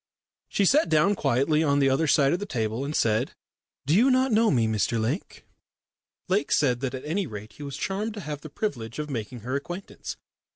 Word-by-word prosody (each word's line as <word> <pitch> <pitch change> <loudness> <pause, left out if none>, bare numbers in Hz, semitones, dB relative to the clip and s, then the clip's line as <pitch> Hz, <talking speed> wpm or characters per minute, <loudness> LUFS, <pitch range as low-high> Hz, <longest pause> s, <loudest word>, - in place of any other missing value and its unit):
She 200 - +1
sat 295 - +4
down 160 +6 +4
quietly 145 -1 +2
on 140 -2 +2
the 140 -1 +4
other 155 +4 +2
side 140 -1 +4
of 175 - 0
the 205 - -5
table, 115 - -2
and 145 +2 -3
said: 110 +3 +1 0.5
"Do 150 +5 +3
you 240 +7 +5
not 260 0 +3
know 220 +1 +4
me, 120 -5 +3
Mr 110 +1 0
Lake?" 125 - -3 0.8
Lake 195 +2 0
said 125 -5 +3
that 130 0 -3
at 130 - -7
any 180 +4 -1
rate 105 -2 -8
he - - -13
was 140 -1 -6
charmed 210 +6 -2
to 205 - -6
have 150 -3 -5
the 155 - -9
privilege 120 - -4
of 150 -1 -4
making 120 -1 -5
her 125 +4 -4
acquaintance. 175 +7 -6
145 Hz, 210 wpm, -26 LUFS, 125-190 Hz, 0.8 s, you